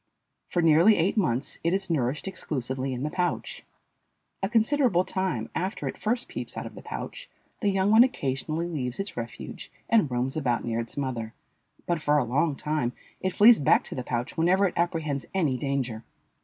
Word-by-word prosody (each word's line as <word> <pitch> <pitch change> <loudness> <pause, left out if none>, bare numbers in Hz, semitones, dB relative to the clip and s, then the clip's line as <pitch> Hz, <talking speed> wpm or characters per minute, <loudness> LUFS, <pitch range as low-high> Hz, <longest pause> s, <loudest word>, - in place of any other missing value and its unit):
For 175 - 0
nearly 165 +7 +6
eight 170 +4 +2
months 140 - 0
it 170 +2 +2
is 195 0 0
nourished 140 +2 -1
exclusively 130 -7 -3
in 125 +1 -3
the 150 - -2
pouch. 180 -1 -2 0.8
A 195 - 0
considerable 230 -4 +3
time 180 -13 -2
after 190 +4 -2
it - - -3
first 235 +3 -1
peeps - - -6
out - - -4
of - - -8
the - - -10
pouch - - -7 0.3
the 205 - +1
young 195 +1 +2
one 225 +2 +8
occasionally 155 - -2
leaves 130 -6 -4
its 195 +1 -4
refuge 115 -1 -7 0.2
and 215 -10 +3
roams 125 +1 -1
about 125 -6 0
near 115 -1 -1
its 115 +3 -6
mother, 120 -5 -3 0.5
but 170 -3 -1
for 150 0 +3
a 145 - +3
long 140 +6 +1
time 150 -5 -1 0.3
it 185 -1 -1
flees 225 +4 +7
back 140 - +4
to - - -8
the 125 - -4
pouch 120 0 -3
whenever 180 +4 +3
it 185 - 0
apprehends 160 -5 -1
any 155 -9 +2
danger. 130 -5 -2
155 Hz, 185 wpm, -27 LUFS, 130-190 Hz, 0.8 s, one